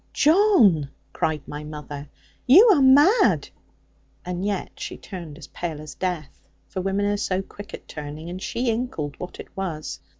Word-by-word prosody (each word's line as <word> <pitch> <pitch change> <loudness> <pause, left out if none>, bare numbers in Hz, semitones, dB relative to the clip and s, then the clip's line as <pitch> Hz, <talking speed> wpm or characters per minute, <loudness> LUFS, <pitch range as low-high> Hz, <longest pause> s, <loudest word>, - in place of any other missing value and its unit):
'John,' 290 - +4 0.2
cried 155 -2 -1
my 150 +1 -6
mother, 150 -1 -8 0.4
'you 395 - +8
are 295 - +3
mad!' 290 - +5 0.8
And 180 +1 -3
yet 200 -2 -3
she - - -5
turned 170 -6 -9
as - - -10
pale 165 -4 -5
as 150 -1 -9
death; 175 -6 -5 0.2
for 185 - -4
women 195 +2 0
are 205 0 +1
so 190 -2 -1
quick 205 +1 -11
at - - -15
turning; 150 +1 -7
and 180 +2 -6
she 235 +3 -1
inkled 220 - -3
what 180 - -8
it - - -11
was. 170 -6 -4
185 Hz, 165 wpm, -24 LUFS, 155-235 Hz, 0.8 s, you